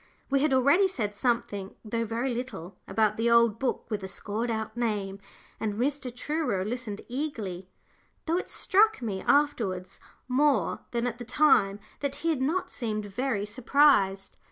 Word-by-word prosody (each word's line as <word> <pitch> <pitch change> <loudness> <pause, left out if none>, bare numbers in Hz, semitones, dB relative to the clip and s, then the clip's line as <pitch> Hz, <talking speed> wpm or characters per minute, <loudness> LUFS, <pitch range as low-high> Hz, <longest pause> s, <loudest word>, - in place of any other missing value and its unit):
We 275 - +4
had 295 +1 +2
already 280 +9 +5
said 220 - -2
something, 205 -4 -1
though 230 +2 -1
very 235 +4 -1
little, 225 -7 -6
about 215 -1 +1
the 230 +1 +2
old 235 -2 +4
book 265 - -1
with 210 -2 -1
the 190 - -5
scored 210 +4 -3
out 220 -1 -3
name, 205 -5 -2 0.4
and 215 -2 -2
Mr. 265 +3 -1
Truro 250 -6 -1
listened 220 -2 -4
eagerly, 225 - -4 0.6
though 330 +2 +1
it - - -7
struck 425 - +3
me 200 -4 -3
afterwards 215 -11 +1 0.3
more 280 +3 +2
than 235 0 -1
at 240 0 -3
the - - -5
time 240 -6 +3 0.2
that 280 -1 -2
he - - +3
had 285 -5 -1
not 320 +8 0
seemed 215 -4 -3
very 205 0 -2
surprised. 210 -4 +3
235 Hz, 160 wpm, -28 LUFS, 205-275 Hz, 0.6 s, already